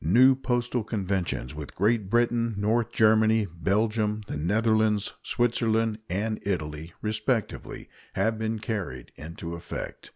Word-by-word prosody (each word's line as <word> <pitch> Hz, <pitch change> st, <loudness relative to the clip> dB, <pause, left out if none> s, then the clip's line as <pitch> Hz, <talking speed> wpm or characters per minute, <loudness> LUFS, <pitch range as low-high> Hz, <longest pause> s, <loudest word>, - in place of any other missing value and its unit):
New 125 Hz, -, +6 dB
postal 120 Hz, -2 st, -1 dB
conventions 95 Hz, -, -2 dB
with 75 Hz, -1 st, -8 dB
Great 105 Hz, 0 st, +1 dB
Britain, 120 Hz, 0 st, +2 dB
North 110 Hz, +3 st, +1 dB
Germany, 110 Hz, 0 st, +4 dB
Belgium, 105 Hz, +5 st, 0 dB
the -, -, -5 dB
Netherlands, 105 Hz, +5 st, +2 dB
Switzerland, 115 Hz, -2 st, +1 dB
and 105 Hz, +5 st, -1 dB
Italy, 80 Hz, -4 st, -3 dB
respectively, 110 Hz, +2 st, -2 dB, 0.3 s
have 110 Hz, -1 st, 0 dB
been 110 Hz, 0 st, -1 dB
carried 100 Hz, -, -4 dB
into 85 Hz, +2 st, -7 dB
effect. 85 Hz, -, -7 dB
110 Hz, 120 wpm, -27 LUFS, 95-115 Hz, 0.3 s, New